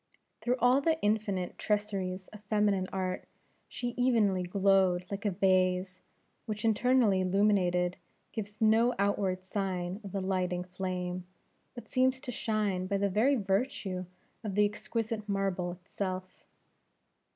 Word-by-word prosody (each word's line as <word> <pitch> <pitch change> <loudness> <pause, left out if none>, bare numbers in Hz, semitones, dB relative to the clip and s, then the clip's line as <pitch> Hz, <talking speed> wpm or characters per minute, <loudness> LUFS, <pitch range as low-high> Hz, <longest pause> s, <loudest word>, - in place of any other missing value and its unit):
Through 245 +1 +1
all 250 +3 +4
the 320 +2 +1
infinite 205 -4 0
traceries 195 -3 -1
of 210 - -12
feminine 205 -2 +2
art, 185 -1 -3 0.4
she 245 - -4
evenly 235 -6 +2
glowed 185 -1 +3
like 200 +1 -4
a - - +4
vase 185 -1 +1 0.5
which, 215 0 -3
internally 225 -3 +3
illuminated, 185 -2 +2 0.3
gives 210 -1 -6
no 225 +2 +4
outward 195 -2 0
sign 185 -1 -2
of 195 - -7
the 195 - -2
lighting 185 -2 -1
flame, 180 0 -4 0.5
but 240 - -9
seems 260 0 +2
to 260 -3 -5
shine 210 -5 -1
by 200 +1 0
the 200 0 +1
very 225 +9 +3
virtue 195 -3 -1 0.4
of 205 -3 -3
the 210 0 +5
exquisite 215 +1 -3
marble 195 -3 0
itself. 185 0 -5
195 Hz, 130 wpm, -31 LUFS, 185-215 Hz, 0.5 s, the